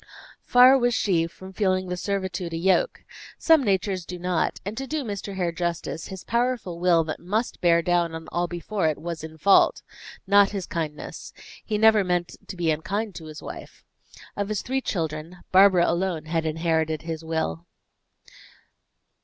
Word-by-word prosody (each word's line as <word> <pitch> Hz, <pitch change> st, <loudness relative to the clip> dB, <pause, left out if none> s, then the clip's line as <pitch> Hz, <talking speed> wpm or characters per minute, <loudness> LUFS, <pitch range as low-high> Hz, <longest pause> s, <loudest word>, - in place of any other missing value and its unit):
Far 255 Hz, +2 st, +7 dB
was 245 Hz, -1 st, +2 dB
she 170 Hz, -5 st, +1 dB
from 190 Hz, +3 st, -12 dB
feeling 185 Hz, -2 st, 0 dB
the 180 Hz, -, -2 dB
servitude 185 Hz, -2 st, -3 dB
a -, -, -2 dB
yoke: 190 Hz, -, +1 dB, 0.3 s
some 320 Hz, -4 st, +4 dB
natures 195 Hz, -3 st, 0 dB
do 180 Hz, +2 st, -7 dB
not: 180 Hz, -1 st, -1 dB
and 205 Hz, +2 st, -4 dB
to 270 Hz, +3 st, -5 dB
do 305 Hz, +1 st, -2 dB
Mr. 200 Hz, -3 st, -5 dB
Hare 180 Hz, -2 st, -1 dB
justice, 170 Hz, -1 st, -3 dB
his 190 Hz, -1 st, -8 dB
powerful 235 Hz, -7 st, -1 dB
will 175 Hz, -2 st, +4 dB
that 155 Hz, 0 st, -5 dB
must 215 Hz, +7 st, -2 dB
bear 170 Hz, -1 st, +4 dB
down 170 Hz, -2 st, 0 dB
all 175 Hz, 0 st, -1 dB
before 175 Hz, +1 st, -2 dB
it, 155 Hz, -, 0 dB
was 165 Hz, -1 st, -6 dB
in 160 Hz, 0 st, -9 dB
fault: 195 Hz, +6 st, +4 dB, 0.4 s
not 200 Hz, 0 st, +5 dB
his 195 Hz, -3 st, -4 dB
kindness: 160 Hz, -5 st, -5 dB, 0.3 s
he 215 Hz, -, -2 dB
never 220 Hz, -1 st, +5 dB
meant 175 Hz, -1 st, -1 dB
to -, -, -7 dB
be 170 Hz, -2 st, +1 dB
unkind 200 Hz, +7 st, -2 dB
to 165 Hz, -, -9 dB
his 155 Hz, -1 st, -10 dB
wife. -, -, -10 dB, 0.5 s
Of 200 Hz, 0 st, -2 dB
his 215 Hz, -2 st, -2 dB
three 265 Hz, +1 st, -1 dB
children, 160 Hz, -, -4 dB
Barbara 185 Hz, -2 st, +6 dB
alone 170 Hz, -2 st, -1 dB
had 160 Hz, 0 st, -1 dB
inherited 160 Hz, -1 st, 0 dB
his 165 Hz, -1 st, -5 dB
will. 160 Hz, +1 st, -3 dB
180 Hz, 170 wpm, -25 LUFS, 165-200 Hz, 0.5 s, Far